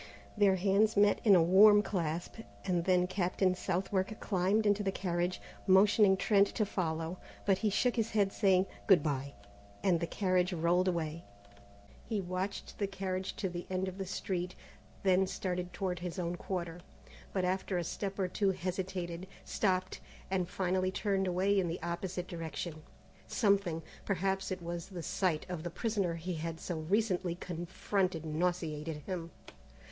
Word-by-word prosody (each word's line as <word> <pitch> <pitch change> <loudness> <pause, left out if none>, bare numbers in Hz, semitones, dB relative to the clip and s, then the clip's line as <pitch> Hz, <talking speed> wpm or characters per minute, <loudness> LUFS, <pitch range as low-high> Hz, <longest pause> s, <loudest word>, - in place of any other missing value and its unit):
Their 200 -3 +4
hands 200 +3 +2
met 205 0 +4
in 205 -4 +7
a 170 - +6
warm 205 +4 +7
clasp, 170 -3 -3 0.3
and 175 -3 0
then 180 -1 +4
Captain 185 0 +1
Southwark 190 +3 -1
climbed 200 +2 +1
into 205 0 +3
the 195 -1 0
carriage, 180 -1 -1 0.3
motioning 195 +1 +6
Trent 200 0 +4
to 215 - +2
follow; 165 -2 -2 0.3
but 195 -2 +3
he 215 - +2
shook 245 +5 +1
his 225 -1 +1
head 200 -2 +1
saying, 190 -3 +4 0.2
"Good 190 -8 +6
bye!" 140 -2 -2 0.5
and 180 -4 +3
the 170 - -2
carriage 185 -1 +1
rolled 175 +2 +2
away. 165 -2 -2 0.9
He 220 -3 0
watched 185 +2 -4
the 200 - +1
carriage 190 -1 -3
to 195 - -2
the 175 -1 -6
end 185 0 -1
of 190 +1 -6
the 190 - -3
street, 180 -1 -3 0.5
then 190 0 +4
started 180 -2 -3
toward 180 -2 -2
his 180 +1 -5
own 175 -1 -2
quarter, 175 -2 -4 0.5
but 185 -2 0
after 185 0 -1
a 175 - 0
step 195 +4 -4
or 190 -2 +1
two 195 +2 +1
hesitated, 185 -1 -3 0.2
stopped, 185 -2 0 0.3
and 185 -2 0
finally 185 0 0
turned 195 0 0
away 190 +3 +2
in 180 - +1
the 165 +1 -3
opposite 175 +1 -3
direction. 165 -1 -5 0.5
Something 200 -7 +1 0.2
perhaps 195 0 -1
it 185 -2 -4
was 170 0 -4
the 180 -4 -7
sight 170 -4 0
of 180 -3 -4
the 175 - -4
prisoner 200 -3 -1
he 175 +2 -4
had 165 0 -4
so 170 -1 -4
recently 185 0 0
confronted 175 0 -2
nauseated 160 -2 -2
him. 175 -3 -4
185 Hz, 160 wpm, -32 LUFS, 175-195 Hz, 0.9 s, in